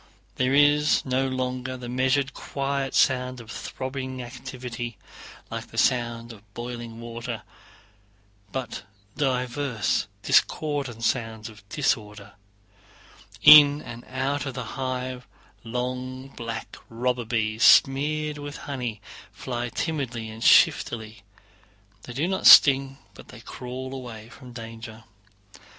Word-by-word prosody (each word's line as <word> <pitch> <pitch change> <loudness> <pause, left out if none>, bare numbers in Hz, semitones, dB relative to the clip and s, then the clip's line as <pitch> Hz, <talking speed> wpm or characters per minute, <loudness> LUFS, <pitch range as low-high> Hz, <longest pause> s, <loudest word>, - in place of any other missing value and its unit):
There 130 +1 +2
is 145 +1 +4
no 130 0 0
longer 130 0 -3
the 125 -1 -8
measured 130 +2 +1
quiet 140 -1 -3
sound 125 -1 +2
of 115 -1 -11
throbbing 130 -1 -5
activity, 120 -2 -7 0.5
like - - -5
the - - -13
sound 120 -1 0
of 105 -1 -19
boiling 120 -1 -7
water, 115 0 -6 1.1
but 130 -3 -5 0.3
diverse 125 -3 -1 0.2
discordant 140 -7 +1
sounds 115 -2 -2
of 110 -1 -15
disorder. 105 -7 -2 1.1
In 145 -1 +9
and 120 0 -9
out 140 +2 -2
of 130 - -5
the 125 - -4
hive 130 -1 -4 0.4
long 125 +2 -4
black 115 -3 -7
robber 125 +1 -1
bees 110 -1 -2
smeared 150 +4 +4
with 145 0 -7
honey 125 -6 -4 0.3
fly 120 +3 -4
timidly 120 -8 -3
and 110 +1 -8
shiftily. 110 -2 +3 0.8
They 120 - -9
do 145 +7 -1
not 190 0 +1
sting, 135 -1 +8 0.2
but - - -15 0.2
crawl 130 +1 -7
away 120 -4 -8
from 125 0 -13
danger. 115 -1 -9
125 Hz, 115 wpm, -25 LUFS, 115-135 Hz, 1.1 s, In